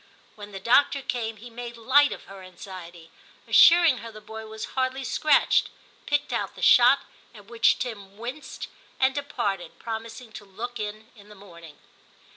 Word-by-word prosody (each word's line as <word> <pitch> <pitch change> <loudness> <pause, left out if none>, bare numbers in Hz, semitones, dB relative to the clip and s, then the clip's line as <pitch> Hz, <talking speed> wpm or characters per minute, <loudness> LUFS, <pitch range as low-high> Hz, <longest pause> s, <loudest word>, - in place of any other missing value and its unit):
II - - -29
TIM - - -31
25 - - -32
When - - -17
the 195 - -7
doctor 280 +1 +4
came 225 -3 -3
he 240 +4 -11
made 235 0 -8
light 275 +5 +4
of - - -7
her 195 -1 -12
anxiety, 175 -2 -11 0.4
assuring 335 -6 +6
her 230 - -9
the 215 - -11
boy 220 +1 -9
was 220 0 -6
hardly 260 0 -1
scratched, 300 +3 +2 0.4
picked 290 -1 0
out - - -3
the - - -9
shot, - - +6 0.3
at 205 -2 -14
which 230 +1 +2
Tim 200 -5 -7
winced, 250 +7 -7 0.3
and 265 0 +3
departed, 200 - -3
promising 225 +1 -7
to 215 - -10
look 225 +5 -7
in 215 +2 -6
in 205 -1 -17
the 210 - -13
morning. 170 -6 -14
225 Hz, 180 wpm, -25 LUFS, 200-255 Hz, 0.4 s, assuring